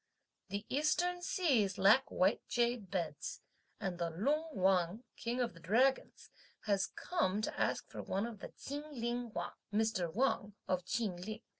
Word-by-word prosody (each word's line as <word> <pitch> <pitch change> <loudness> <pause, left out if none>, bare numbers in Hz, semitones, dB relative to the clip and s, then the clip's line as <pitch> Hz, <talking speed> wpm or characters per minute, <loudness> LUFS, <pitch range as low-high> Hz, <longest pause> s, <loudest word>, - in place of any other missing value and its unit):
The 200 +2 -3
eastern 350 +5 +1
seas 260 - +2
lack 220 +8 +6
white 190 +5 +2
jade 240 -4 +1
beds, 170 -6 -3 0.4
and 180 -2 -3
the 170 -1 0
"Lung 285 - 0
Wang," 185 +3 +2
king 235 +2 -2
of 240 -2 0
the 165 - -14
Dragons, 245 +10 +1 0.3
has 200 -2 +1
come 295 - 0
to - - -3
ask - - 0
for - - -6
one 195 +3 -1
of 230 -3 -7
the - - -8
Chin 285 +2 -4 0.2
Ling 240 0 -2
Wang, - - -3 0.2
(Mr. 210 -5 +1
Wang 210 -2 +1
of 185 -1 +1
Chin 205 -4 -1
Ling.) 215 +5 -6
220 Hz, 160 wpm, -35 LUFS, 190-250 Hz, 0.4 s, lack